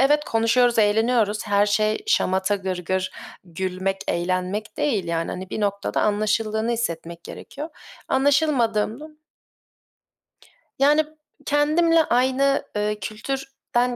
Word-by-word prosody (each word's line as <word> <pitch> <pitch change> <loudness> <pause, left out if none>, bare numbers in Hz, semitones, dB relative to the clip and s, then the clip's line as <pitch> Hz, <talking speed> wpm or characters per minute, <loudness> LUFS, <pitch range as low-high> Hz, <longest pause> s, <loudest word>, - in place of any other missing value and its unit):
Evet, 295 +3 +3
konuşuyoruz, 230 +1 +2
eğleniyoruz. 215 0 +2
Her 205 0 +3
şey 215 +1 +1
şamata, 190 - +2
gırgır, 185 0 -2 0.3
gülmek, 185 +2 -3
eğlenmek 185 +4 -2
değil, 220 -11 0
yani. 165 -1 -2
Hani, 185 +1 -6
bir - - -3
noktada 200 -1 -1
anlaşıldığını 215 +2 0
hissetmek 170 -7 -4
gerekiyor. 295 +3 -8 0.4
Anlaşılmadığımda 265 -3 +1 1.7
Yani, 295 +3 +4 0.4
kendimle 320 +3 +3
aynı, 265 +1 +2
eee, 210 0 -1
kültürden 250 +3 -3
215 Hz, 100 wpm, -23 LUFS, 195-265 Hz, 1.7 s, Yani